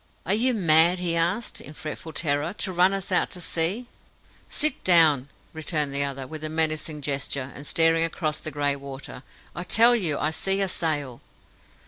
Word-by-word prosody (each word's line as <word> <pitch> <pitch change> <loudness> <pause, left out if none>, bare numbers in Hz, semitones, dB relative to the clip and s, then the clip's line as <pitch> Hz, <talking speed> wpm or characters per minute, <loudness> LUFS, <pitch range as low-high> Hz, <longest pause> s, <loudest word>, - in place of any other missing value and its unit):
"Are 190 - +1
you 245 +4 +1
mad?" 170 -2 +4
he 175 -2 -2
asked, 175 +7 -1
in 150 - -11
fretful 155 +2 -7
terror, 150 +2 -1
"to 190 -2 -3
run 180 +2 +4
us 195 0 -3
out 180 - +1
to 180 - -6
sea?" 175 +7 0 0.6
"Sit 305 -2 -1
down!" 155 -7 +4 0.2
returned 155 -3 -1
the 140 0 +1
other, 135 -1 -4
with 155 +3 -9
a 155 - -3
menacing 155 -1 -1
gesture, 140 -1 -2
and 145 +1 -7
staring 165 0 +3
across 155 -2 -2
the - - -4
grey 145 -2 -1
water. 135 -2 -9 0.3
"I - - -4
tell 230 +7 +6
you 175 -10 0
I 155 - -1
see 195 +4 0
a 195 - +1
sail!" 145 -8 -3
160 Hz, 180 wpm, -25 LUFS, 145-180 Hz, 0.6 s, tell